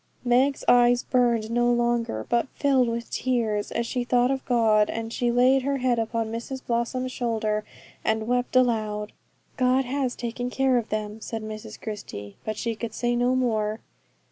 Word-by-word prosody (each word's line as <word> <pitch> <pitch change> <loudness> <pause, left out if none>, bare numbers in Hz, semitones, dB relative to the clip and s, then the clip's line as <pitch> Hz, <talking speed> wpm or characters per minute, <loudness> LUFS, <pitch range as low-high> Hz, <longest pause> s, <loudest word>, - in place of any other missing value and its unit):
Meg's 260 +3 +2
eyes 245 0 +5
burned 235 -4 +1
no 240 +1 +3
longer, 235 - 0
but 235 +2 +1
filled 270 -3 +3
with 235 0 -4
tears 230 -5 -1
as 235 - -1
she 245 +1 -2
thought 245 +1 +2
of 270 -1 -2
God, 220 -4 +3
and 225 0 -4
she 245 - 0
laid 250 +3 +4
her 275 +1 -1
head 250 -2 +1
upon 225 0 -2
Mrs 250 +3 -6
Blossom's 245 +2 -1
shoulder, 220 -4 -1 0.4
and 220 0 0
wept 245 +1 0
aloud. 215 -4 +1 0.5
'God 255 +1 +3
has 260 -1 -1
taken 245 +1 -4
care 260 -1 +2
of 230 - -7
them,' 215 0 -4
said 225 0 -5
Mrs 215 0 -8
Christie, 105 - -7
but 215 -1 -4
she 230 - -2
could 225 0 -6
say 240 0 0
no 245 +1 +2
more. 220 -4 0
240 Hz, 170 wpm, -25 LUFS, 220-250 Hz, 0.5 s, eyes